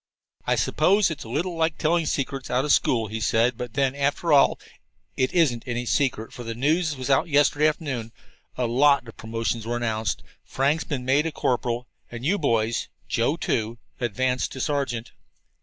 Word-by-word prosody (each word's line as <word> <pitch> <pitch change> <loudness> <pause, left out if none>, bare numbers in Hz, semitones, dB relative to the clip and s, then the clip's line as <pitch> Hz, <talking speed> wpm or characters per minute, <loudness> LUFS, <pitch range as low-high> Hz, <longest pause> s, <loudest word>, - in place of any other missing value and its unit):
"I - - +3
suppose 185 +4 +3
it's 150 - -6
a - - -9
little 170 +8 -2
like 160 -1 0
telling 165 0 +1
secrets 135 -2 -2
out 125 +3 +1
of 150 - +4
school," 115 -3 +2
he 110 +1 -5
said, 115 +3 +2
"but 120 -1 -7
then, 135 -2 +2
after 140 +3 0
all, 140 - +5 0.6
it 130 0 +1
isn't 145 -10 +2
any 120 0 -2
secret, 120 -4 0
for 120 - -8
the 115 -1 -5
news 155 +5 +1
was 130 +1 -3
out 135 +6 +3
yesterday 145 0 +3
afternoon. 135 -8 -3 0.5
A 125 - 0
lot 135 +2 +3
of 115 - -11
promotions 115 0 -3
were 120 +1 -1
announced. 110 -2 -2 0.2
Frank's 145 +4 0
been 130 -5 -4
made 140 +5 +3
a - - -3
corporal, 120 -3 -1 0.2
and 120 +1 -7
you 200 +6 +2
boys 115 -5 0 0.2
Joe, - - +1
too 115 +1 -1 0.2
advanced 125 +2 -1
to 130 - -7
sergeant." 135 -5 -2
130 Hz, 180 wpm, -25 LUFS, 120-150 Hz, 0.6 s, all